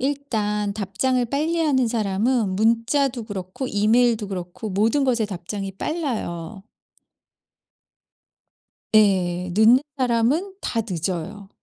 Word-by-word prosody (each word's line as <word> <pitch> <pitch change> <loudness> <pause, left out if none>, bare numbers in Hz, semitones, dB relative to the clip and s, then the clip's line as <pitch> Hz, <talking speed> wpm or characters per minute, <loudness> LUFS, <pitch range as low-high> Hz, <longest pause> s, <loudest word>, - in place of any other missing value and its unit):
일단 220 -7 -1
답장을 220 +5 0
빨리하는 290 -1 +1
사람은 220 0 0
문자도 235 +4 +1
그렇고 195 +4 -5
이메일도 220 0 +2
그렇고 185 +3 -6
모든 225 +9 +2
것에 240 -4 +1
답장이 195 +1 -5
빨라요. 200 - -4 2.3
예. 180 -4 +3
늦는 220 +6 +6 0.2
사람은 260 +9 +1
다 230 - -1
늦어요. 185 +3 -4
220 Hz, 230 characters per minute, -23 LUFS, 195-255 Hz, 2.3 s, 늦는